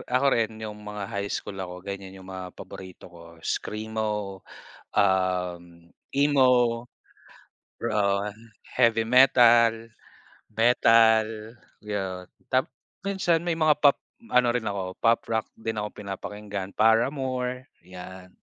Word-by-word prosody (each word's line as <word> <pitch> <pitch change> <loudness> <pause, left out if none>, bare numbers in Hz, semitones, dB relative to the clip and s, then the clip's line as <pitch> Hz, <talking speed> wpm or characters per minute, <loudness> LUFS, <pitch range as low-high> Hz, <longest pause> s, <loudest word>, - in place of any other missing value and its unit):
ako 130 +2 +2
rin 115 -1 0
'yung 105 -1 -6
mga 105 -1 -5
high 100 -2 -3
school 100 -1 -5
ako 90 -1 -7
ganiyan 95 -1 -7
'yung 95 0 -13
mga 95 -1 -7
paborito 95 -2 -11
ko 85 - -14 0.2
Screamo, 105 -2 -3 0.6
um, 95 -3 +1 0.5
Emo, 140 -2 +4 1.3
pro, 115 -1 -2 0.3
ah, 105 - -6 0.4
Heavy 115 -1 +3
metal, 120 -3 +5 0.7
metal 115 -1 +5 0.5
'yun. 95 -3 -4 0.2
Tapos 130 0 +2 0.4
minsan 190 -4 +1
may 170 -2 0
mga 155 -2 +4
pop 145 -2 +6 0.3
ano 125 -1 +4
rin 120 -3 -2
ako 95 -2 -4
Pop 115 0 +3
Rock 110 -1 0
din 110 -1 -3
ako 105 0 -3
pinapakinggan 100 0 -6
Paramore, 125 +2 +1 0.2
'yan. 90 0 -11
110 Hz, 115 wpm, -26 LUFS, 95-120 Hz, 1.3 s, pop